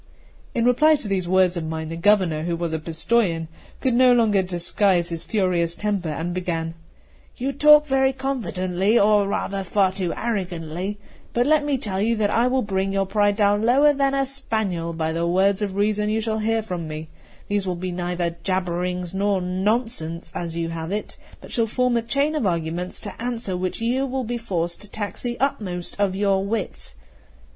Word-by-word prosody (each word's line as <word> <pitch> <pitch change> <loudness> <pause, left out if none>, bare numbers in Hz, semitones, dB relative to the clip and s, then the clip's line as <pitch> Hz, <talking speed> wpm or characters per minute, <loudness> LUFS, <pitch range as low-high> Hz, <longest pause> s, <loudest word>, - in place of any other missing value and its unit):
In 235 - +1
reply 305 +6 +5
to 275 -7 -3
these 190 -3 -1
words 185 -1 +4
of 170 - -3
mine, 160 0 -4
the 165 - -4
Governor, 175 -3 +3
who 170 -1 -1
was 165 -1 -3
a 160 - -1
Pistojan, 165 +1 0 0.3
could 260 -3 +1
no 250 +1 +6
longer 220 -5 +3
disguise 180 0 +1
his 165 -1 -4
furious 180 -5 0
temper, 200 -5 -2
and 165 +3 -3
began: 165 -3 -2 0.6
"You 265 +3 -1
talk 300 +2 +6
very 265 -1 +2
confidently, 210 -7 0
or 205 -1 +4
rather 195 0 -2
far 190 0 +2
too 190 -2 -2
arrogantly; 185 -3 -3 0.4
but 240 +1 +2
let 305 +1 +3
me 290 -2 0
tell 200 -6 -2
you 230 +2 +2
that 210 -2 +1
I 235 +3 +3
will 260 +1 +1
bring 195 -1 -1
your 195 0 +1
pride 205 +1 +2
down 205 0 +3
lower 275 +6 +5
than 275 -1 +1
a 275 0 +1
spaniel 220 -11 -1
by 160 -1 -2
the 170 +1 -1
words 190 +3 +2
of 200 -2 -2
reason 210 +1 +1
you 220 +1 +1
shall 220 0 -1
hear 225 +1 0
from 180 -6 -4
me; 155 0 -6 0.4
these 205 -2 -1
will 180 - -1
be 180 +1 -4
neither 175 -1 -2
jabberings 180 -1 -2
nor 200 0 +1
nonsense, 185 -2 -1
as 170 -1 -4
you 165 -1 -1
have 165 +1 -5
it, 210 +1 -4 0.3
but - - -12
shall 230 -2 +1
form 250 +2 +1
a 235 - +2
chain 280 +6 0
of 295 -10 0
arguments 170 +1 -2
to - - -8
answer 235 -5 -3
which 180 0 -3
you 255 +4 0
will 260 0 -2
be 240 +1 -3
forced 175 -6 -3
to 210 - -12
tax 205 -3 -5
the 240 -1 -4
utmost 185 -10 -2
of 195 -2 +1
your 195 -1 +2
wits. 205 - -4
195 Hz, 195 wpm, -23 LUFS, 175-230 Hz, 0.6 s, no